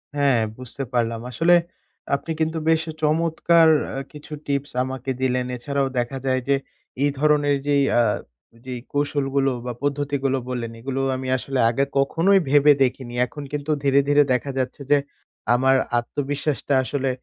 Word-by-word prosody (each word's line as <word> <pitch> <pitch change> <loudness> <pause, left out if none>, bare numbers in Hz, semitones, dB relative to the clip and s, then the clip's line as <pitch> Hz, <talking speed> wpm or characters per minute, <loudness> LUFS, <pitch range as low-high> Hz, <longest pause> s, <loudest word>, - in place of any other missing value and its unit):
হ্যাঁ, 140 -4 +3 0.2
বুঝতে 130 +2 -6
পারলাম। 115 -1 0
আসলে 165 +8 +3 0.6
আপনি 150 +4 -5
কিন্তু 160 +1 0
বেশ 160 0 +3 0.2
চমৎকার 165 +1 +3 0.3
আ - - -4
কিছু 150 +1 -11
tips 140 0 -2
আমাকে 130 0 -4
দিলেন। 125 -1 +1
এছাড়াও 140 +2 -1
দেখা 120 +3 -2
যায় 130 -1 +2
যে 140 - +5 0.5
এই 145 - +4
ধরনের 145 -1 +3
যেই 140 -1 +3 0.2
আ - - +6 0.6
যেই 125 -1 -5
কৌশলগুলো 140 -2 0
বা 125 - -3
পদ্ধতিগুলো 140 -1 0
বললেন, 120 -2 -3
এগুলো 135 +3 -3 0.2
আমি 130 0 -5
আসলে 135 +1 -3
আগে 120 +4 +1
কখনোই 170 +8 +3
ভেবে 145 +1 +6
দেখিনি। 125 -1 -2
এখন 145 +3 -9
কিন্তু 145 +1 -2
ধীরে, 140 0 +4
ধীরে 145 0 +5
দেখা 125 +3 -1
যাচ্ছে 130 +2 -3
যে 145 - +7 0.6
আমার 130 +2 +4 0.2
আত্মবিশ্বাসটা 145 +3 -2
আসলে 135 0 -1
140 Hz, 150 wpm, -23 LUFS, 130-145 Hz, 0.6 s, যে